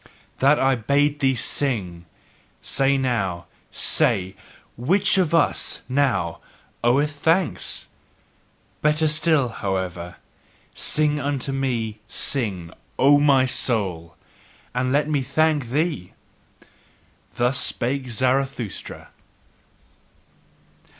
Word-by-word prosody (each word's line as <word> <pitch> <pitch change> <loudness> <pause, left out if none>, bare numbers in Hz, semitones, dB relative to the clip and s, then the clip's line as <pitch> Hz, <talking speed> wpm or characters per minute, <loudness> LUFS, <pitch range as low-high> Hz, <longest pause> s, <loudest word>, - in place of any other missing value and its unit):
That 140 +3 +4
I 135 0 +3
bade 140 +5 +1
thee 135 -1 +2
sing, 100 -10 -2 0.5
say 135 +1 +1
now, 100 -10 -2 0.3
say: 95 0 +2 0.4
WHICH 190 - +1
of 180 -4 +1
us 165 - +1
now 135 0 0 0.4
oweth 140 +5 +2
thanks? 155 - 0 1.0
Better 150 +1 +2
still, 150 -3 +2
however: 95 -5 -4 0.6
sing 150 -1 0
unto 140 -1 -2
me, 120 -5 -2
sing, 100 - 0 0.3
O 145 +2 +5
my 140 -3 +4
soul! 95 -10 -1 0.6
And 125 +1 -1
let 145 +2 +1
me 150 -3 0
thank 145 -1 0
thee! 150 - -2 1.2
Thus 125 +2 +1
spake 130 +1 -2
Zarathustra. 130 -1 -2
135 Hz, 90 wpm, -22 LUFS, 110-145 Hz, 1.2 s, O